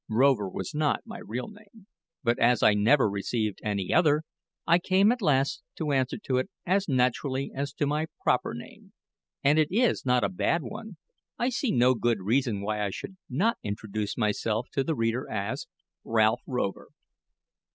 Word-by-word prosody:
Rover 115 -3 +3
was 95 0 -5
not 150 -1 +1
my 230 0 -8
real 125 +3 -5
name; 210 -1 -16 0.4
but 120 -1 +1
as 120 -1 +3
I 105 - +6
never 110 +6 +4
received 105 +1 -2
any 100 -3 -1
other, 155 -3 +4 0.4
I 170 +1 +5
came 190 +4 +4
at 245 0 -2
last 140 -6 +2 0.2
to 155 -2 -1
answer 130 -2 +1
to 130 - 0
it 130 - -1 0.2
as 195 +2 +1
naturally 130 +1 0
as 140 +1 -3
to 150 - -1
my 150 +2 0 0.2
proper - - +1
name. - - -12 0.5
And 145 +3 +4
as 155 - +5
it 150 - -19
is 245 +1 +2
not 125 -1 +2
a - - +2
bad 175 -3 0
one, 210 - -8 0.4
I 240 - +1
see 255 0 -1
no 125 0 +4
good 120 -2 +1
reason 110 +1 0
why 105 +1 -1
I 100 - 0
should 190 - -7
not 200 - +1
introduce 105 0 -4
myself 110 +1 0
to 135 - 0
the 160 +3 -1
reader 115 +2 -1
as 100 -2 -3 0.4
Ralph 115 +1 +2
Rover. 125 -7 -2
130 Hz, 180 wpm, -27 LUFS, 110-160 Hz, 0.5 s, I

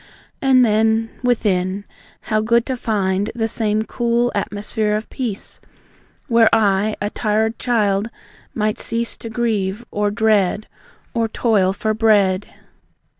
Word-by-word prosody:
And 260 -2 +5
then, 220 +1 +2
within, 200 -6 0 0.4
how 215 0 0
good 235 +1 +2
to 260 - -2
find 200 -4 -1
The 225 -1 0
same 215 -1 0
cool 240 +1 0
atmosphere 210 +1 -1
of 215 +1 -5
peace, 235 -7 -4 0.7
Where 230 -3 +5
I, 210 -1 +2
a 205 0 -2
tired 220 +1 0
child, 210 -3 +1 0.5
might 215 -1 -1
cease 230 0 -2
To 230 - -8
grieve, 225 -2 -1
or 205 0 0
dread, 215 -2 +1 0.5
Or 230 -1 +1
toil 210 -4 +2
for 215 +3 -1
bread. 205 -3 +2
215 Hz, 125 wpm, -20 LUFS, 205-230 Hz, 0.7 s, And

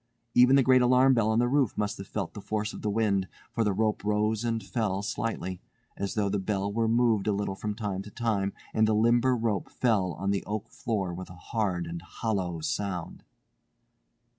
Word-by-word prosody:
Even 125 +2 +6
the 135 - +5
great 130 0 +5
alarm 130 +2 +5
bell 115 -3 +2
on 110 - +2
the 120 +1 +3
roof 135 -3 +1
must 105 -1 -1
have 95 - -7
felt 100 -5 -4
the 105 - -8
force 105 +1 -2
of - - -8
the 105 - -1
wind, 100 -3 +1 0.2
for 115 - 0
the 105 - +2
rope 110 +2 0
rose 105 +1 +1
and 115 -1 -1
fell 105 -5 -1
slightly, 95 -4 -3 0.3
as 100 -1 -3
though 105 -2 +1
the 100 +1 0
bell 100 0 -2
were 115 +1 +1
moved 115 -3 +2
a - - +3
little 100 -1 -1
from 105 +2 -4
time 100 -4 -3
to 105 - -9
time 105 -3 -1 0.2
and 110 0 +3
the 110 - +2
limber 120 +3 +4
rope 110 -5 -1
fell 100 -8 +1
on 100 +5 -2
the 100 - -1
oak 105 +1 -3
floor 100 -6 -2
with 90 +2 -7
a 90 - -10
hard 90 -1 -2
and 85 0 -6
hollow 90 -2 -3
sound. 90 +1 -3
105 Hz, 210 wpm, -28 LUFS, 95-115 Hz, 0.3 s, Even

